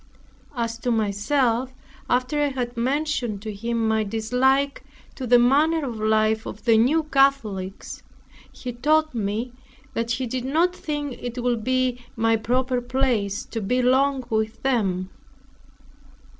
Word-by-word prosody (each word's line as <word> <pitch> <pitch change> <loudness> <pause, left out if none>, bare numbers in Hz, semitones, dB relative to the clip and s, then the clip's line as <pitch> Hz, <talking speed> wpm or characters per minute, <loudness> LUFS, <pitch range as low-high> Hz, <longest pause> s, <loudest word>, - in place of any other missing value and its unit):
As 230 -1 -2
to 245 - -2
myself, 235 +4 +1 0.3
after 255 +4 +1
I 290 - +3
had 250 -3 -3
mentioned 250 -4 -1
to 215 -1 -5
him 230 +2 -1
my 220 0 +2
dislike 250 +6 +1 0.3
to 255 - -6
the 245 +1 +6
manner 290 +6 +3
of 235 -3 -5
life 215 0 +1
of 210 +2 -9
the 230 -2 +5
New 270 +9 +3
Catholics, 235 -10 0 0.5
he 250 -1 -7
told 310 +5 +2
me, 225 +2 -2 0.4
that 230 0 -2
he 245 +3 -1
did 250 +1 -3
not 330 +7 +1
think 295 -5 -4
it 245 0 -5
would 240 -3 0
be 255 -1 0
my 225 -1 +2
proper 250 +3 0
place 245 -6 -1
to 225 - -5
be 250 +5 0
long 265 +1 +3
with 220 0 -1
them. 195 -8 0
245 Hz, 145 wpm, -24 LUFS, 220-265 Hz, 0.5 s, the